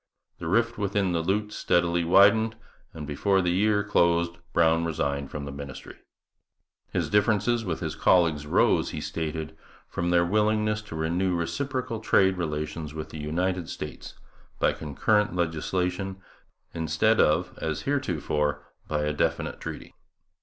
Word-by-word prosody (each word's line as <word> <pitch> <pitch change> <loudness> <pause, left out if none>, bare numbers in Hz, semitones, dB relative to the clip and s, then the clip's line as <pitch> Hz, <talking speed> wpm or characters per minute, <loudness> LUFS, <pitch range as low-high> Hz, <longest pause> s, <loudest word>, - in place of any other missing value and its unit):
The 85 - -5
rift 115 +6 +1
within 100 -2 0
the 85 -1 0
lute 105 +5 -1
steadily 85 0 +1
widened, 100 +6 +5 0.4
and 75 -2 -7
before 95 +7 +1
the 90 -2 +1
year 105 +3 +2
closed 85 -4 +2
Brown 80 -1 +3
resigned 70 -4 -2
from 75 -2 -5
the 70 - -6
ministry. 70 -2 -9 0.9
His - - -1
difference 105 0 +2 0.2
with 90 -6 -3
his - - -2
colleagues 80 -5 +3
arose, - - +3
he - - -5
stated, 80 -1 -4 0.3
from 85 - -2
their 85 0 +4
willingness 105 +2 +1
to - - -6
renew 85 +3 0
reciprocal 125 +6 -2
trade 95 -3 +3
relations 75 -2 -4
with 80 -1 -5
the 80 - -7
United 90 +3 -1
States - - -7 0.4
by - - +2
concurrent 105 +7 0
legislation 90 +3 -1 0.6
instead 80 +8 +1
of, 80 +4 +2
as 80 -1 -2
heretofore, 75 - -1 0.2
by 75 -1 -1
a 75 0 0
definite 75 - -1
treaty. - - -7
85 Hz, 140 wpm, -26 LUFS, 80-100 Hz, 0.9 s, widened